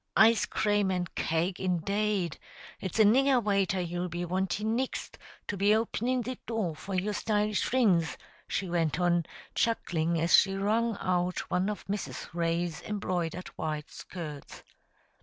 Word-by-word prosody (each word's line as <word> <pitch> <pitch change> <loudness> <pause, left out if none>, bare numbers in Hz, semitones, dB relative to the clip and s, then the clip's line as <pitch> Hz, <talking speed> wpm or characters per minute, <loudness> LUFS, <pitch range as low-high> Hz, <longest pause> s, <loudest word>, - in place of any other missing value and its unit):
Ice 220 -1 +6
crame 205 -2 +1
an' 180 -1 0
cake, 170 +3 0
indade! 190 0 0 0.4
It's 190 - -4
a 220 - +7
nigger 260 +4 +5
waiter 195 -2 +1
you'll 175 0 -2
be 175 +1 -3
wantin' 190 +5 -1
nixt, 260 +2 -3 0.3
to 205 - -2
be 200 +2 +4
openin' 240 +3 0
the 255 +2 -5
door 215 -9 -1
for 190 +5 -5
your 200 +3 0
stylish 210 0 +1
frinds," 195 -10 +2 0.3
she 190 - -2
went 170 -2 0
on, 175 -2 +2 0.3
chuckling, 170 -7 0
as 165 +2 +5
she 195 0 +4
wrung 220 +3 +1
out 180 -1 -1
one 185 +3 +1
of 210 - -5
Mrs. 195 -11 -4
Ray's 170 -1 -1
embroidered 180 -4 -3
white 155 -1 -4
skirts. 155 -6 -8
190 Hz, 145 wpm, -29 LUFS, 175-210 Hz, 0.4 s, a